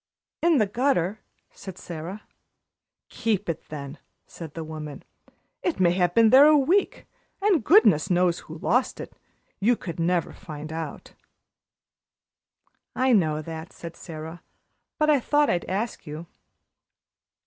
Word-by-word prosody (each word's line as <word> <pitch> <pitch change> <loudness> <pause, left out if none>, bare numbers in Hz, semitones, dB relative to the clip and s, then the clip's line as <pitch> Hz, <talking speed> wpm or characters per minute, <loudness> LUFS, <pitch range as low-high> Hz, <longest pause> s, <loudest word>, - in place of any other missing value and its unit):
"In 335 -2 +4
the 215 - +3
gutter," 220 -3 0 0.3
said 190 -2 -10
Sara. 175 +5 -7 0.9
"Keep 210 -3 -1
it, 165 - -4
then," 145 0 -7 0.3
said 160 -3 -10
the 165 - -4
woman. 155 -2 -8 0.6
"It 350 - -2
may 175 -2 +4
have 175 -1 +1
been 225 -1 +5
there 275 +3 +8
a 305 0 +6
week, 345 +9 +1 0.3
and 390 - +2
goodness 205 - +5
knows 180 -1 +2
who 160 - -10
lost 250 +10 0
it. - - -8 0.5
You 230 +5 +3
could 170 -6 -7
never 170 0 0
find 155 -4 -8
out." 160 0 -7 1.8
"I 255 0 +3
know 155 -7 +2
that," 160 +3 -8
said 170 0 -9
Sara, 160 0 -9 0.6
"but 305 0 +3
I 290 - +4
thought 295 +4 +2
I'd 175 - -1
ask 200 +1 -4
you." 155 +3 -7
180 Hz, 135 wpm, -25 LUFS, 160-245 Hz, 1.8 s, there